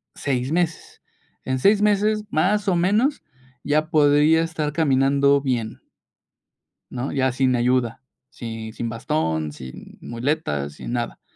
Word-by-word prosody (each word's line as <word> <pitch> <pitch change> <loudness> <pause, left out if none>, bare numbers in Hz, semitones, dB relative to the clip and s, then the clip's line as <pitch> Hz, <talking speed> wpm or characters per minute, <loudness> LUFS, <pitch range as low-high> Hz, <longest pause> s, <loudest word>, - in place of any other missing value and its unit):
6 130 -2 -2
meses. 170 -1 -2 0.4
En 130 0 -1
6 200 +9 +4
meses, 210 +1 +2
más 200 +6 +1
o 185 - +3
menos, 210 - +1 0.4
ya 155 +2 +1
podría 150 +1 +4
estar 160 -2 -3
caminando 140 -2 +3
bien. 120 -5 -3 1.1
¿No?, 130 +2 -4
ya 130 -2 +1
sin 130 0 +1
ayuda, 120 -1 0 0.3
si 115 -1 -7
sin 115 +1 -4
bastón, 80 -8 -2
sin 65 -3 -11
muletas, 115 - -2
sin - - -7
nada. 120 -1 -3
140 Hz, 125 wpm, -22 LUFS, 120-160 Hz, 1.1 s, 6